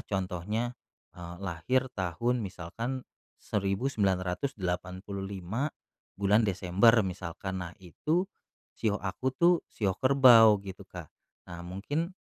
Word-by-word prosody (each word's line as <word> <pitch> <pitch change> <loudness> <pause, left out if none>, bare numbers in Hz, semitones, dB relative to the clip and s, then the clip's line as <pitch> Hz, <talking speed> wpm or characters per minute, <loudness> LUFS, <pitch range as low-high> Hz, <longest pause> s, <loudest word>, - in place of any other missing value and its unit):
contohnya, 100 +5 -2 0.4
eee, 85 0 -8
lahir 100 +8 0
tahun 110 +7 0
misalkan 100 +8 -5 0.4
1985, 95 - -2 0.5
bulan 100 +3 +4
Desember 95 +3 +4
misalkan. 95 +1 -5
Nah, 85 - -8
itu 155 - -1 0.5
shio 105 -2 0
aku 115 +7 -2
tuh 175 +4 +5 0.2
shio 95 -4 -1
kerbau 125 -5 +7
gitu, 95 0 -9
Kak. 85 -4 -9 0.4
Nah 85 0 -7
mungkin 145 - -3
100 Hz, 100 wpm, -29 LUFS, 90-120 Hz, 0.5 s, kerbau